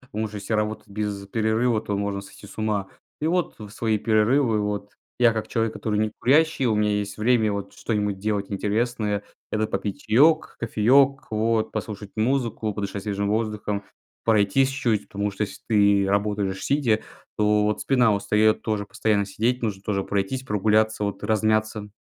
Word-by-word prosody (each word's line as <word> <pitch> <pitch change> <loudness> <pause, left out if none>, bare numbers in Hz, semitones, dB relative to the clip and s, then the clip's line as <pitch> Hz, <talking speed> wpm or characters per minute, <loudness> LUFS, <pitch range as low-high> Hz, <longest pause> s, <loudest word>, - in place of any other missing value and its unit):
Потому 110 -4 -4
что 105 - -9
если 100 +2 -5
работать 105 0 -2
без 100 -1 -4
перерыва, 110 +1 +1
то 105 -2 -3
можно 100 0 -2
сойти 100 - -13
с 100 - -14
ума. 105 -3 -1 0.3
И 155 - -1
вот 175 0 0
в 105 -2 -9
свои 110 -1 0
перерывы 110 +2 +2
вот 105 0 -3 0.3
я, 120 -1 +5
как 110 -1 -4
человек, 115 -1 0
который 105 -2 -2
некурящий- 135 +7 +2
у 110 - +2
меня 105 0 +2
есть 100 0 -4
время 110 -1 +2
вот 100 -1 -5
что-нибудь 105 -3 -2
делать 105 0 -2
интересное- 105 0 -1 0.3
это 110 0 +1
попить 95 +1 -3
чаёк, 150 +9 +3
кофеёк, 130 +4 +3
вот 110 0 +1
послушать 105 -2 -5
музыку, 115 -3 0
подышать 100 -1 -4
свежим 100 -1 -1
воздухом, 105 -2 -2 0.4
пройтись 110 +4 +3
чуть. 120 -6 -1
Потому 100 +1 -2
что 100 +2 -4
если 100 - -9
ты 100 -3 +4
работаешь 100 -1 -1
сидя, 125 -7 +2 0.4
то 105 0 +3
вот 105 0 0
спина 125 -5 +3
устаёт 105 +1 +2
тоже 105 -2 -1
постоянно 105 0 0
сидеть- 120 +5 -1
нужно 105 -4 -2
тоже 100 -2 -1
пройтись, 100 +6 -2
прогуляться, 110 -2 +1
вот 100 - -4
размяться. 110 0 0
105 Hz, 165 wpm, -24 LUFS, 100-115 Hz, 0.4 s, я